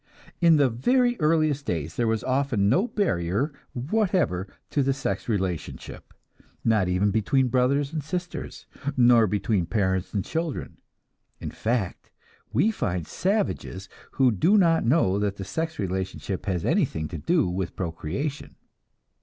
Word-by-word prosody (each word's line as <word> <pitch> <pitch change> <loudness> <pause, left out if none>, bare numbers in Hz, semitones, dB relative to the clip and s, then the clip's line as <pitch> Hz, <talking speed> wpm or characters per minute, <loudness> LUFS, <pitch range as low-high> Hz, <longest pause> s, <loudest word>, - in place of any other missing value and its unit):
In 170 -2 +6
the 145 -3 +4
very 245 - +2
earliest 155 -3 +2
days 80 -1 -2
there 120 - +1
was 110 -1 0
often 130 -6 +1
no 180 - +3
barrier 135 - 0 0.2
whatever 150 - 0 0.2
to 145 - +2
the 135 0 +2
sex 125 -6 -3
relationship; 95 -6 -4 0.5
not 110 -5 +3
even 90 +3 +2
between 125 +5 +2
brothers 135 +4 +1
and 155 -3 -2
sisters, 175 0 -5 0.3
nor 120 -2 +6
between 100 -2 0
parents 95 -3 0
and 100 -3 -2
children. 165 -2 -4 0.6
In - - -5
fact, 115 -5 -2 0.4
we 150 - +3
find 90 - -2
savages 185 - -2 0.2
who 130 -2 +4
do 170 - +3
not 165 -4 +4
know 115 - +3
that 100 -1 -1
the 95 - -6
sex 160 - -3
relationship 95 0 -3
has 90 -4 -1
anything 140 - +1
to - - -6
do 165 - +2
with 90 0 -3
procreation. 95 - -4
125 Hz, 140 wpm, -25 LUFS, 95-155 Hz, 0.6 s, In